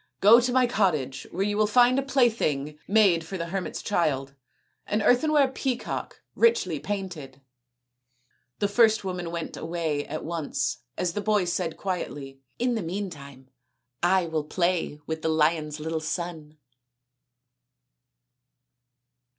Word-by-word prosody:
" - - -56
Go 220 +4 +8
to 245 +1 0
my 255 0 +4
cottage, 155 - 0
where 190 +3 -1
you 205 0 -1
will 215 0 +3
find 245 +3 +5
a - - +1
plaything 220 - +1
made 195 -6 +4
for 190 +4 -6
the 170 - -3
hermit's 180 -1 -4
child 140 -8 0 0.5
an 210 +1 0
earthenware 280 +3 +4
peacock 260 -1 -4
richly 465 0 +2
painted." 175 -10 -5 1.2
The 205 - +1
first 220 +1 +4
woman 180 -2 -4
went 170 -1 -5
away 160 -3 -2
at 155 +2 -5
once 150 -6 -2 0.2
as 175 -2 -1
the 210 - -2
boy 210 -2 +2
said 170 -2 -2
quietly, 140 -8 -5
" - - -45
In 245 +1 +1
the 225 - -1
meantime 150 -8 -7 0.5
I 185 +1 +3
will 160 -2 -2
play 170 -2 -1
with 160 0 -4
the 160 - 0
lion's 155 -1 +1
little 160 +1 -2
son." 155 -1 -5
175 Hz, 140 wpm, -26 LUFS, 155-210 Hz, 1.2 s, Go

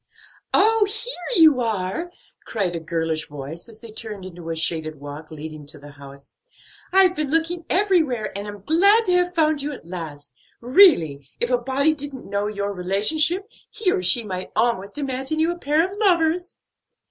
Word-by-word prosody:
"Oh, 440 0 +4
here 440 -2 -3
you 295 -5 +6
are!" 225 - -2 0.3
cried 195 -6 -2
a - - -2
girlish 160 -1 -2
voice 145 - -8
as 220 -1 -14
they 230 -2 -10
turned 210 -3 -6
into 175 -2 -9
a 165 - -2
shaded 160 -2 -2
walk 145 +2 -9
leading 155 -1 -8
to 150 +1 -10
the 145 0 -13
house. 140 -1 -15 0.5
"I've 375 -1 +5
been 305 -4 -2
looking 330 +2 -1
everywhere 320 - +1
and 200 +1 -4
am 205 -2 -9
glad 400 - +4
to 360 - +2
have 360 0 0
found 310 -2 +2
you 290 +2 -3
at 255 - -11
last. 150 -6 -8 0.3
Really, 230 - +4
if 240 - 0
a 250 - +4
body 270 +5 +2
didn't 285 -3 -8
know 200 +1 -1
your 200 -1 -3
relationship, 295 - 0 0.2
he 430 -4 0
or - - 0
she 185 +6 +5
might 185 -3 -5
almost 215 -3 0
imagine 270 +1 -3
you 320 +2 +2
a 345 - -7
pair 310 +4 +2
of 385 - -10
lovers." 350 -3 +1
235 Hz, 180 wpm, -22 LUFS, -, 0.5 s, you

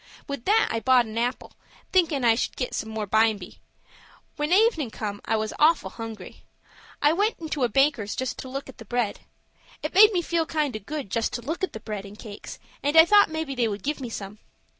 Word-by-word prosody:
With 280 -4 -6
that 440 +2 +3
I 230 - -1
bought 255 0 +4
an 220 0 -9
apple, 245 +2 -2 0.4
thinkin' 325 -8 +2
I 230 - +6
should 230 - -2
get 250 - -3
some 220 - -3
more 220 -1 -3
bimeby. 220 -2 +1 0.8
When 295 +1 -2
evenin' 375 - +3
come 205 -2 -5
I 225 - +1
was 215 0 -2
awful 315 +2 +3
hungry. 225 -4 -9 0.6
I 295 +2 +5
went 415 +6 +1
into 310 -4 -3
a 245 - +2
baker's 255 -4 +1
just 260 -2 -3
to 260 - -7
look 275 +2 -5
at 265 - -13
the 225 - -10
bread. 240 -1 -1 0.6
It 300 - -3
made 420 +3 +8
me 355 -4 0
feel 330 -1 0
kind 300 -7 -1
o' - - -3
good 275 0 -6
just 230 - -1
to 240 - -4
look 320 +9 -4
at 375 - -1
the 220 - -6
bread 210 -2 -6
and 205 +1 -12
cakes, 210 -3 -9 0.2
and 290 +3 +1
I 320 - +10
thought 410 +1 +6
maybe 315 -3 -3
they 245 -3 +1
would 205 -2 -5
give 295 0 -2
me 245 - -5
some. 205 -1 -7
255 Hz, 225 wpm, -25 LUFS, 220-315 Hz, 0.8 s, I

